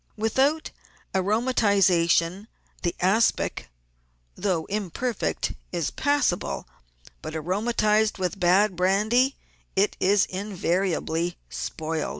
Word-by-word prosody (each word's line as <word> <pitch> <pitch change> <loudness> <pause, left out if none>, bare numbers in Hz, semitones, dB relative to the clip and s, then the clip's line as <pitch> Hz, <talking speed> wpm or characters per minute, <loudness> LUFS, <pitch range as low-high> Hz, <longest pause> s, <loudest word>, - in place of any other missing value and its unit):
Without 265 +8 +1 0.4
aromatisation 195 -4 +2 0.3
the 175 - -1
aspic, 195 - +1 0.6
though 180 -5 -1
imperfect, 215 +4 -2 0.2
is 170 -4 -2
pas 290 0 +1
sable; 175 - -2 0.5
but 155 +1 -6
aromatised 210 +5 +1
with 185 +1 -2
bad 185 +2 +3
brandy 215 +9 +2 0.4
it 200 +2 +2
is 195 +1 +3
invariably 180 -3 -1
spoilt. 155 - -3
195 Hz, 90 wpm, -25 LUFS, 175-215 Hz, 0.6 s, bad